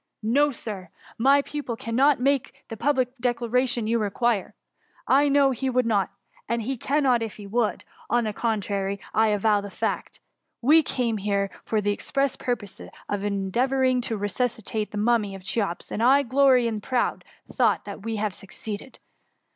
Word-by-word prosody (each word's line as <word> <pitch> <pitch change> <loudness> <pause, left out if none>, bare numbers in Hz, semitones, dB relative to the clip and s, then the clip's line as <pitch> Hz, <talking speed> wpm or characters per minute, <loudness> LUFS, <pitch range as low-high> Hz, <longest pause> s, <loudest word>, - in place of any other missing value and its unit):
No, 285 +7 +3
Sir! 205 -7 -7 0.3
Tny 275 +4 +5
pupil 285 -5 -4
cannot 255 +5 +2
make 275 0 0
the 225 - -5
public 260 +1 +1
declaration 245 0 0
you 230 +1 +1
require, 215 0 0 0.5
I 285 +2 +4
know 280 -1 +4
he 265 +1 -2
would 255 -1 +2
not 205 -4 +1 0.2
— - - -29
and 235 0 0
he 265 +5 -2
cannot 260 -1 +2
if 225 -2 -4
he 205 - -10
would; 220 +2 -1
— - - -24
on 240 0 +2
the 215 -1 -2
contrary, 200 -3 -1
I 220 0 +4
avow 210 0 +2
the 200 - -7
fact. - - -3 0.4
We 305 +6 +6
came 245 -6 -1
here 200 -1 -1
for 215 -1 0
the 205 0 +1
express 275 +5 -1
purpose 225 -6 -4 0.3
of 205 -1 -2
endeavouring 250 +6 +1
to 230 -2 -3
resuscitate 215 0 -2
the 210 - -6
mummy 210 -2 +1
of 190 - -11
Cl^eops, 195 -3 -2
and 215 - -2
I 270 +4 +5
jglory 260 -1 +4
in 225 -2 -1
the - - -16
proud 255 -2 0 0.3
thought 230 -6 +2
thR 200 - -6
we 225 +2 -4
have 210 -2 -1
succeeded. 205 +5 -8
230 Hz, 175 wpm, -25 LUFS, 205-255 Hz, 0.5 s, We